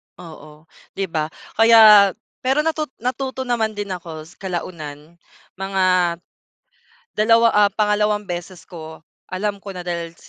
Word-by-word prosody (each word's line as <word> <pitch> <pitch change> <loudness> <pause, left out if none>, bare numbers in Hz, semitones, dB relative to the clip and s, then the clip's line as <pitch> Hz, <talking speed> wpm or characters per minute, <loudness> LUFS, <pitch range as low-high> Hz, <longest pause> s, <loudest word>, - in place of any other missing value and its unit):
Oo. 155 -3 -13 0.3
Di 195 - -2
ba? 155 -2 -1 0.3
Kaya 215 -4 +8 0.3
pero 270 +4 +1
natut 315 -1 -1
natuto 260 +2 -3
naman 225 -4 -1
din 205 -1 -5
ako 165 -4 -7 0.2
kalaunan. 170 -3 -7 0.4
Mga 195 0 -1 1.3
2, 230 +2 +4
ah, 205 -1 +4
pangalawang 210 0 +1
beses 175 -1 -7
ko, 160 -2 -11 0.2
alam 200 +2 -3
ko 195 -1 -9
na 180 - -6
dahil 170 -1 -5
195 Hz, 120 wpm, -20 LUFS, 170-220 Hz, 1.3 s, Kaya